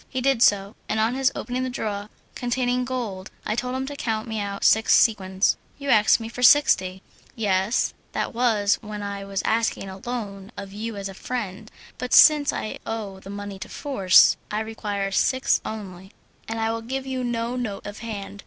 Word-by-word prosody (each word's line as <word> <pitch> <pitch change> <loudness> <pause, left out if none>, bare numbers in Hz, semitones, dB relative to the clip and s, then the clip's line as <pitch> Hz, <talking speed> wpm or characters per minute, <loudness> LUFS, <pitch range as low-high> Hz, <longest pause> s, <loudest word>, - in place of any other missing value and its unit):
He 260 - -3
did 265 -2 +2
so, 200 -2 +3
and 220 - 0
on 220 +2 +2
his 265 +1 +2
opening 255 +1 -3
a 260 - -2
drawer 210 -4 -4 0.2
containing 250 0 0
gold, 225 -7 -4 0.2
I - - 0
told 250 +2 -2
him 265 0 -2
to 285 +1 -6
count 220 -4 -2
me 220 -1 -3
out 200 -1 -4
six 220 0 +5
sequins. 190 -3 +3 0.2
"You 280 -1 -5
asked 215 +1 +5
me 225 - -5
for 235 +2 -7
sixty." 190 -9 +5 0.3
"Yes, 205 0 +1 0.2
that - - -2
was 225 -4 +2
when 210 -2 -6
I 200 0 -4
was 195 -1 -3
asking 225 -3 0
a 190 0 -9
loan 205 -4 -6
of 195 -1 -7
you 220 +2 -5
as 200 -1 -4
a 195 - -8
friend; 215 -1 -5 0.3
but 250 0 -3
since 300 -2 +7
I 215 - -4
owe 210 -4 -5
the 195 - -12
money 200 -1 -6
to - - -8
force, 200 -11 +4
I 210 +1 -1
require 205 -3 -3
six 260 +6 +2
only, 195 -3 -8 0.3
and 225 0 -3
I 225 0 +1
will 230 0 -3
give 265 +3 -4
you 260 -1 -3
no 240 0 -2
note 235 -6 -4
of 205 0 -7
hand. 205 -3 -6
220 Hz, 195 wpm, -24 LUFS, 200-245 Hz, 0.3 s, since